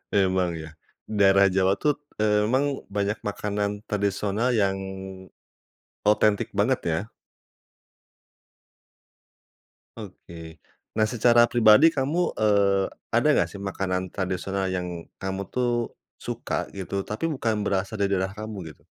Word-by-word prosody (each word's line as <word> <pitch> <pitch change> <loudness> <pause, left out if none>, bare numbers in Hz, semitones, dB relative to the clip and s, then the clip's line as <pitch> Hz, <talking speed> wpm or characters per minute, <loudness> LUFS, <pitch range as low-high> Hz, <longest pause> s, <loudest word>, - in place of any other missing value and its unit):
Emang 95 -3 +2
ya, 80 0 -10 0.3
daerah 100 -2 +5
Jawa 95 +1 +2
tuh, 150 -1 +2 0.2
eee, 105 -1 +3
emang 135 +5 0
banyak 100 +1 -1
makanan 105 0 -2
tradisional 105 +3 0
yang 100 -4 +2 1.3
otentik 105 0 +3
banget, 120 +5 +2
ya. 80 -1 +1 3.0
Oke, 85 -6 -10 0.4
nah 110 - +4
secara 120 +1 +4
pribadi 120 +7 +6
kamu, 155 +5 0
eee, 100 -2 +2 0.2
ada - - +3
nggak - - +4
sih 100 - -8
makanan 95 -1 -2
tradisional 95 +1 -2
yang 90 -2 -4 0.2
kamu 95 +1 -3
tuh 120 -2 0 0.2
suka - - -3
gitu, 95 0 -4
tapi 110 +10 -2
bukan 115 -8 -1
berasal 100 +1 -2
dari 100 - +2
daerah 95 +1 -2
kamu 105 -6 -7
gitu? - - -29
100 Hz, 115 wpm, -25 LUFS, 95-110 Hz, 3.0 s, pribadi